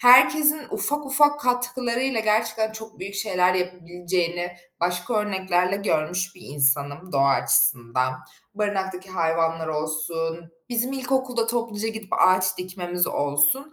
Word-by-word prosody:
herkesin 260 +5 +6
ufak 295 0 -2
ufak 290 +2 +3
katkılarıyla 250 -1 0
gerçekten 220 0 +1
çok 220 0 -10
büyük 200 +2 -7
şeyler 185 -3 +1
yapabileceğini 175 -1 -2 0.2
başka 180 +6 -1
örneklerle 190 -2 0
görmüş 180 0 -1
bir 180 - -17
insanım 145 +4 0
doğa 140 0 +3
açısından. 125 -1 +2 0.4
Barınaktaki 190 -3 -3
hayvanlar 165 -2 0
olsun, 160 +2 -3 0.2
bizim 245 +2 -1
ilkokulda 260 -3 -1
topluca 230 -2 -2
gidip 220 -3 -7
ağaç 185 0 +3
dikmemiz 180 -1 -2
olsun. 145 - +1
185 Hz, 115 wpm, -24 LUFS, 170-235 Hz, 0.4 s, herkesin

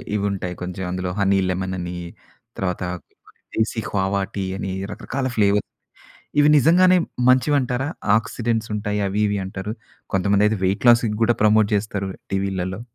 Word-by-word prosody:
ఇవి 100 -1 0
ఉంటాయి. 90 -2 -4
కొంచెం 90 +1 -5
అందులో 90 0 -3
హనీ 100 0 +3
లెమన్ 95 +1 -2
అని. 90 0 -5 0.6
తర్వాత 90 -2 -2 0.3
ఇంకోటి - - -26 0.2
దేశీ 110 +1 0
కోవా 100 0 0
టీ 95 -1 -2
అని 95 - -4 0.2
రకరకాల 130 0 -3
ఫ్లేవర్ 105 0 +3 0.8
ఇవి 145 - +5
నిజంగానే 180 +6 +5 0.3
మంచివంటారా? 130 0 +2 0.3
ఆక్సిడెంట్స్ 115 0 -2
ఉంటాయి, 105 0 -2
అవి 100 +2 -1
ఇవి 100 0 -1
అంటారు. 95 +2 -5 0.4
కొంతమంది 100 +2 +3
అయితే 110 -1 0
వెయిట్ 100 +5 0
లాస్ 120 0 +6 0.2
కూడా 120 +1 +3
ప్రమోట్ 110 -1 +4
చేస్తారు 100 -1 -2 0.2
టీవీల్లలో. 95 0 -2
100 Hz, 145 wpm, -22 LUFS, 95-115 Hz, 0.8 s, లాస్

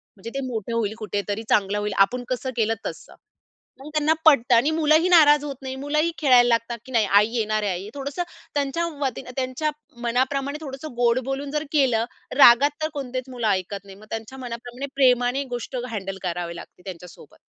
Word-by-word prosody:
म्हणजे 200 +3 -8
ते 275 - -1
मोठं 230 -2 -4
होईल 220 -2 0
कुठेतरी 205 0 -3
चांगलं 205 0 +2
होईल, 210 -1 -2
आपण 245 +6 +3
कसं 255 +1 -2
केलं 225 0 +2
तसं. - - -7 0.6
मग 275 +3 -10
त्यांना 305 +1 +3
पटतं 265 -6 +5
आणि 240 +6 +4
मुलंही 315 +2 +3
नाराज 295 -4 +6
होत 285 -2 -5
नाही 265 0 -5
मुलंही 300 +4 +1
खेळायला 250 -5 +5
लागतात 235 0 0
की 260 - -12
नाही 230 -4 +3
आई 200 +2 +5
येणार 215 -1 0
आहे. 205 - 0
आई 185 +3 -5
थोडंसं 280 +5 -4 0.3
त्यांच्या 290 +4 0 0.2
वतीनं 265 -3 -3
त्यांच्या 260 +3 -1 0.3
मनाप्रमाणे 270 +4 0
थोडंसं 275 0 -7
गोड 240 0 +3
बोलून 270 +1 -3
जर 300 0 -1
केलं 255 -7 +2 0.3
रागात 275 +2 +8
तर 310 - 0
कोणतेच 260 -2 -5
मुलं 245 -3 -2
ऐकत 200 0 -1
नाही. 195 - -12
मग 215 - -15
त्यांच्या 225 +4 -6
मनाप्रमाणे 245 +2 -6
प्रेमाने 250 0 +3
गोष्ट 240 +2 -6
हँडल 195 -4 -5
करावी 175 -1 -3
लागते 170 - -12
त्यांच्यासोबत. 175 -4 -11
245 Hz, 180 wpm, -24 LUFS, 215-280 Hz, 0.6 s, रागात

